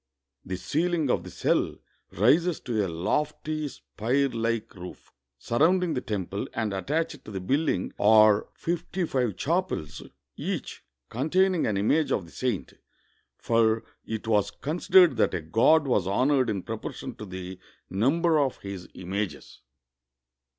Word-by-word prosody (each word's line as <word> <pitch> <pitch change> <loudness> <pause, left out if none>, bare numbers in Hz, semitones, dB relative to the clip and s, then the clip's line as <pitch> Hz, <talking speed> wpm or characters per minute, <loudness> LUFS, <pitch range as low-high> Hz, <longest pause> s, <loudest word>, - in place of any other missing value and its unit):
The 95 0 -4
ceiling 160 - 0
of - - 0
the - - -9
cell - - 0 0.4
rises 155 - +3
to 110 -4 -1
a - - -1
lofty, 150 - -2
spire 135 +2 -1
like 115 -1 -2
roof. 90 -3 -11 0.3
Surrounding 165 +7 +2
the 125 - -2
temple 100 -1 -3
and 110 -3 -1
attached 145 +8 -2
to - - -11
the 100 -2 -4
building 135 - 0
are 110 0 +6
fifty 175 +2 -2
five 125 - -1
chapels, 170 - -2 0.3
each - - -5 0.2
con 130 +7 -3
taining 185 -4 +3
an 100 - -1
image 145 +10 +2
of 95 - 0
the 80 - -16
saint, 125 -7 -3 0.6
for 115 -1 +2 0.2
it 110 0 -5
was 105 -3 +2
considered 175 - +3
that - - +2
a 85 - -2
god 115 - +4
was 105 -8 +1
honored 130 +5 +2
in 100 -4 -2
proportion 110 -1 -6
to 105 - -7
the 95 0 -7 0.3
number 155 - +2
of 135 -3 0
his 100 -2 -7
images. 95 +2 -5
115 Hz, 145 wpm, -27 LUFS, 100-155 Hz, 0.6 s, are